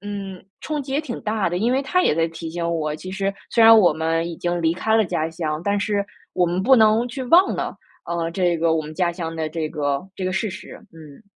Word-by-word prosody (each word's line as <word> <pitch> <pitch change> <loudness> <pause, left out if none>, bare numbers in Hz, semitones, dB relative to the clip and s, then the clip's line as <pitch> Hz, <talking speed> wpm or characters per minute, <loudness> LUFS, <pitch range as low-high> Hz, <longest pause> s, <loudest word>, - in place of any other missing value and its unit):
嗯， 200 -2 -7 0.2
冲 300 -2 -3
击 265 0 -7
也 280 - +1
挺 260 -7 -6
大 210 -4 0
的， 175 - -3
因 230 +7 +1
为 265 - +2
他 360 +7 +1
也 - - +3
在 165 +1 +1
提 165 0 -7
醒 170 0 -3
我， 155 -3 -1
其 185 +3 -8
实 195 0 -1 0.2
虽 230 - +3
然 225 0 +9
我 185 -7 +5
们 165 +2 -1
已 170 - -7
经 175 0 -2
离 165 0 +1
开 220 +4 +1
了 220 - +4
家 160 -3 -2
乡， 160 -2 -3
但 205 0 +1
是 200 0 0 0.3
我 180 - +2
们 175 +2 -1
不 265 +6 +5
能 220 0 +4
去 260 +2 -6
忘 350 +9 +5
了， - - -4 0.3
呃， 170 -1 -2
这 175 -1 +1
个 160 0 +2
我 160 - 0
们 155 0 -8
家 175 +1 0
乡 165 -2 -5
的 160 -1 -2
这 155 -1 -3
个， 145 -2 -2
这 185 - -4
个 185 - -1
事 210 +2 -1
实。 210 +3 -9 0.2
嗯。 160 +3 -14
180 Hz, 275 characters per minute, -22 LUFS, 165-215 Hz, 0.3 s, 然